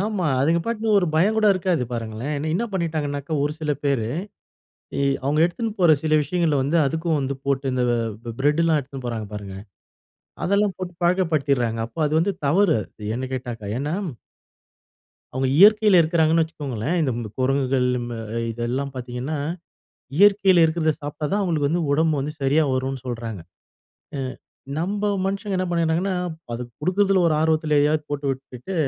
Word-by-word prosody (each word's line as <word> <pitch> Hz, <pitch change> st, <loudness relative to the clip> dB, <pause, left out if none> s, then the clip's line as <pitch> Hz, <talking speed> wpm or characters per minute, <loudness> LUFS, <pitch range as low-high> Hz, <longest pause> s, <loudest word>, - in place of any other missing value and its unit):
ஆமா. 205 Hz, -3 st, -1 dB
அவங்க 165 Hz, +5 st, +3 dB
பாட்டுக்கு 225 Hz, -2 st, +1 dB
ஒரு 180 Hz, -, +1 dB
பயம் 195 Hz, +8 st, +3 dB
கூட 220 Hz, -1 st, +3 dB
இருக்காது 180 Hz, -6 st, 0 dB
பாருங்களேன். 115 Hz, +4 st, -4 dB, 0.2 s
என்ன 215 Hz, +7 st, 0 dB
பண்ணிட்டாங்கன்னாக்கா, 155 Hz, -5 st, -2 dB
ஒரு 150 Hz, -, -1 dB
சில 150 Hz, -1 st, 0 dB
பேரு 135 Hz, -6 st, +1 dB, 1.2 s
அவுங்க 145 Hz, +3 st, +1 dB
எடுத்துட்டு 225 Hz, +6 st, -3 dB
போற 175 Hz, -3 st, +6 dB
சில 155 Hz, -1 st, +1 dB
விஷயங்கள 160 Hz, +1 st, 0 dB
வந்து 150 Hz, +5 st, +1 dB
அதுக்கும் 160 Hz, +2 st, 0 dB
வந்து 140 Hz, 0 st, -2 dB
போட்டு, 140 Hz, 0 st, 0 dB
இந்த 125 Hz, -1 st, +1 dB
வ -, -, +2 dB, 0.4 s
பிரெட் 150 Hz, +4 st, +2 dB
எல்லாம் 165 Hz, -2 st, +3 dB
எடுத்துட்டு 135 Hz, -2 st, -8 dB
போறாங்க 110 Hz, -3 st, -4 dB
பாருங்க. 100 Hz, -2 st, -6 dB, 0.9 s
அதெல்லாம் 200 Hz, 0 st, +2 dB
போட்டு 185 Hz, -1 st, -5 dB
பழக்கப்படுத்திடுறாங்க. 145 Hz, -10 st, +1 dB
அப்போ 115 Hz, -, -16 dB
அது 150 Hz, -, -3 dB
வந்து 195 Hz, +4 st, +1 dB
தவறு 170 Hz, +2 st, +4 dB, 0.4 s
என்ன 130 Hz, -, -3 dB
கேட்டாக்க. 120 Hz, -4 st, -5 dB, 0.2 s
ஏன்னா. 145 Hz, +4 st, -2 dB, 1.4 s
அவங்க 130 Hz, +1 st, 0 dB
இயற்கையில 210 Hz, 0 st, +7 dB
இருக்கிறாங்கன்னு 160 Hz, 0 st, +3 dB
வச்சுக்கோங்களேன், 145 Hz, -2 st, -3 dB
இந்த 120 Hz, -6 st, -2 dB
குரங்குகள் 130 Hz, -1 st, +1 dB, 0.3 s
அ -, -, -5 dB, 0.3 s
இதெல்லாம் 125 Hz, +4 st, -3 dB
பார்த்தீங்கன்னா, 125 Hz, +4 st, -4 dB, 0.8 s
இயற்கையில 195 Hz, -3 st, +6 dB
இருக்கிறதை 160 Hz, -1 st, +2 dB
சாப்பிட்டா 145 Hz, +1 st, -4 dB
தான் 205 Hz, -, +2 dB
அவங்களுக்கு 155 Hz, -6 st, +1 dB
வந்து 170 Hz, +2 st, 0 dB
உடம்பு 160 Hz, +2 st, +2 dB
வந்து 145 Hz, +3 st, -3 dB
சரியா 145 Hz, +4 st, +3 dB
வரும்னு 130 Hz, 0 st, -2 dB
சொல்றாங்க, 115 Hz, -5 st, -5 dB, 0.8 s
அ -, -, -3 dB, 0.6 s
நம்ம 200 Hz, +5 st, -2 dB, 0.2 s
மனுஷங்க 195 Hz, +1 st, -2 dB
என்ன 185 Hz, -, 0 dB
பண்ணறாங்கன்னா, 170 Hz, +3 st, +1 dB, 0.4 s
அது 115 Hz, -, -4 dB, 0.2 s
குடுக்குறதில 190 Hz, +4 st, +2 dB
ஒரு 160 Hz, -, +2 dB
ஆர்வத்தில 155 Hz, -1 st, +2 dB
எதையாவது 150 Hz, +1 st, +2 dB
போட்டு 145 Hz, 0 st, -3 dB
விட்டுட்டு, 130 Hz, +5 st, -7 dB
155 Hz, 150 wpm, -23 LUFS, 135-175 Hz, 1.4 s, இயற்கையில